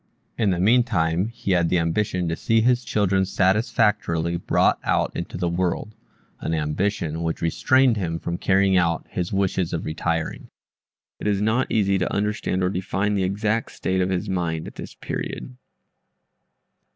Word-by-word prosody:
In 110 -4 +1
the 90 - +1
meantime 100 -5 +2
he 115 -4 -4
had 85 -2 +3
the 90 - +2
ambition 90 +2 0
to 85 - -1
see 115 +6 +2
his 120 +1 +2
children 100 -4 +1
satisfactorily 95 -3 +1
brought 85 - +2
out - - +1
into 85 - -5
the 90 -1 -1
world 90 +4 -1 0.5
an 80 - -2
ambition 80 +1 -1
which 80 0 -2
restrained 130 +8 +3
him 85 -4 -2
from 85 +1 -4
carrying 95 0 +3
out 85 -2 +1
his 90 -1 -3
wishes 95 -3 0
of 85 - -3
retiring. 80 +1 -2 0.7
It - - -3
is 100 -2 +1
not 110 +5 +1
easy 100 -3 +2
to 90 - -1
understand 100 -2 -1
or 90 - +2
define 95 +2 -1
the 100 -2 +1
exact 105 +4 -1
state 95 0 -1
of 90 - 0
his 95 +2 -1
mind 85 -4 -2
at - - -8
this - - -9
period. 125 - -5
95 Hz, 165 wpm, -23 LUFS, 85-105 Hz, 0.7 s, had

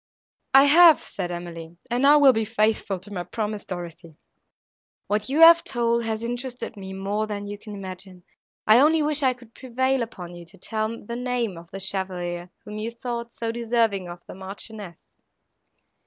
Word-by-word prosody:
—"I 270 - +9
have," 320 +2 +7
said 180 -3 -5
Emily, 170 -1 -8
"and 250 +3 +3
I 290 - +8
will 280 -3 +7
be 225 -1 0
faithful 215 -2 0
to 205 +2 -10
my 180 -2 -3
promise, 210 0 -4
Dorothée;—what 175 +4 -8
you 295 +4 +1
have 335 0 +9
told 235 -1 0
has 220 0 -3
interested 245 +1 -5
me 190 -2 -8
more 200 +3 -2
than 205 -1 -5
you 205 0 -7
can 210 -1 -9
imagine. 185 -1 -9 0.4
I 215 +3 +7
only 310 +3 +4
wish 300 0 0
I 260 -2 +3
could 240 -2 -18
prevail 260 +1 -1
upon 180 -7 -7
you 175 0 -10
to 175 +4 -17
tell 220 +4 -3
the 235 - -5
name 245 -5 -2
of 170 0 -12
the 195 - -7
chevalier, 180 -2 -3 0.2
whom 210 0 -7
you 220 +2 -3
thought 235 0 -5
so 230 -1 -3
deserving 225 -5 0
of 175 0 -10
the - - -10
Marchioness." 195 -1 -7
215 Hz, 175 wpm, -24 LUFS, 190-240 Hz, 0.4 s, I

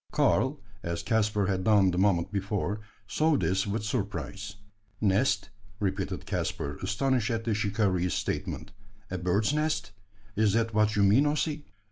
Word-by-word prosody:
Karl, 135 +3 +2 0.2
as 85 -3 -3
Caspar 105 -3 +1
had 95 -1 0
done 100 -3 +5
the 90 - -2
moment 95 -3 +2
before, 100 0 -2 0.3
saw 155 +7 +2
this 95 -3 0
with 105 +1 -2
surprise. 105 -2 -3 0.4
"Nest?" 100 -1 +2 0.3
repeated 95 -1 -2
Caspar, 70 +1 -3
astonished 125 +2 +1
at 115 -1 -1
the 115 -1 0
shikaree's 100 -4 +1
statement. 100 - -3 0.4
"A 90 - -2
bird's 100 +8 +1
nest? 150 -7 0 0.4
Is 105 -1 +3
that 115 0 +1
what 110 0 +3
you 100 - +3
mean, 110 +9 +5
Ossy?" 150 0 -1
105 Hz, 145 wpm, -28 LUFS, 95-115 Hz, 0.4 s, done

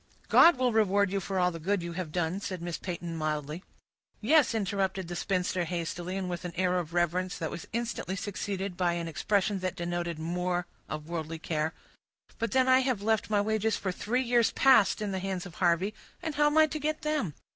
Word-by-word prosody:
"God 335 -4 +7
will 250 -2 +2
reward 200 -2 +3
you 200 - 0
for 195 +1 -3
all 180 0 +3
the 165 - -7
good 190 +2 0
you 170 - -4
have 175 -3 -4
done," 175 +2 -1
said 185 -2 -4
Miss 170 -1 -4
Peyton, 175 -2 -5
mildly. 155 +1 -3 0.6
"Yes," 260 0 +4
interrupted 195 -3 -1
the 175 - -5
spinster 180 -1 0
hastily, 175 +2 -3
and 190 -1 -2
with 175 -1 -4
an 175 -1 -5
air 180 0 +2
of 170 -1 -6
reverence 175 +2 0
that 160 - -3
was 170 - -7
instantly 230 -5 -3
succeeded 195 -1 -3
by 175 -1 +1
an 170 -1 -3
expression 200 +4 0
that 185 -1 -2
denoted 175 -1 -3
more 175 +2 -1 0.2
of 155 0 -5
worldly 165 -1 -4
care; 160 -1 -2 0.6
"but 230 - 0
then 260 0 +3
I 260 0 +6
have 255 -6 0
left 220 0 +1
my 205 -1 +3
wages 220 +1 +1
for 190 - -2
three 245 +8 -1
years 240 -2 +3
past 240 -5 +5
in 205 - -2
the 190 - -2
hands 190 -1 -3
of 180 - -9
Harvey, 180 +4 +2 0.3
and 320 - -2
how 295 +1 +3
am 295 +1 +1
I 315 - +8
to 310 0 -4
get 310 +1 -2
them? 300 - -1
185 Hz, 210 wpm, -29 LUFS, 175-215 Hz, 0.6 s, I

